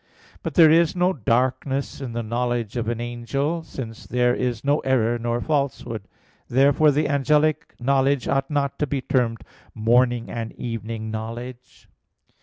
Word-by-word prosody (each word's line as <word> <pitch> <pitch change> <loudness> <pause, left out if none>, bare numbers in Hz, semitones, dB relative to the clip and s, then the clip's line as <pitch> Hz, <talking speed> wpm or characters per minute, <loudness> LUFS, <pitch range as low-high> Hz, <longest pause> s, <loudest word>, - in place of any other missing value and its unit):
But - - -5
there 160 -4 +8
is 165 +1 +4
no 180 +1 +2
darkness 130 - -1
in 125 -4 -5
the 120 0 -2
knowledge 120 -1 -2
of 120 -2 -2
an 120 -1 -2
angel; 120 +7 -2
since 115 -8 -8
there 125 0 +2
is 125 -3 -2
no 145 +2 +2
error 120 -3 +1
nor 120 +1 -1
falsehood. 140 -3 -2 0.4
Therefore 140 +4 +4
the 145 +1 +1
angelic 150 +2 +1
knowledge 135 +1 +2
ought 135 0 0
not 140 -2 -1
to 150 - 0
be 135 -1 -2
termed 120 -3 0 0.3
morning 120 +1 +2
and 115 -1 -5
evening 115 -2 -5
knowledge. 120 +3 -7
125 Hz, 150 wpm, -23 LUFS, 115-140 Hz, 0.4 s, there